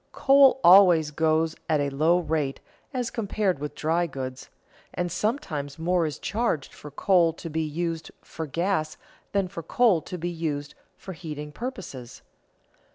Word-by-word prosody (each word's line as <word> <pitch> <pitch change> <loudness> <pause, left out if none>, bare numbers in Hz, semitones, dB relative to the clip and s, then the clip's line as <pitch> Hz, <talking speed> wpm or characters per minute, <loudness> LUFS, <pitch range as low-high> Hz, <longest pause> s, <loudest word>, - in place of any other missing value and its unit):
Coal 275 -1 +5
always 175 -4 +7
goes 160 +1 +1
at 155 -2 +3
a 140 -1 -1
low 155 +5 +3
rate 150 -4 -2 0.3
as 250 -3 -3
compared 205 - -1
with 150 +1 -5
dry 170 +2 0
goods, 130 -3 -7 0.5
and 175 -1 -2
sometimes 175 - -2
more 170 0 +1
is 150 - -5
charged 210 - -2
for 150 - -11
coal 170 +2 +3
to 165 0 -8
be 160 +1 -1
used 165 +1 -3
for 160 -1 -6
gas 165 0 -1 0.3
than 200 -2 +1
for 180 -2 -7
coal 190 +1 +3
to 180 - -7
be 175 +1 -3
used 150 -3 -4 0.2
for 190 - -8
heating 150 -3 -7
purposes. 175 - -7
165 Hz, 155 wpm, -26 LUFS, 150-185 Hz, 0.5 s, always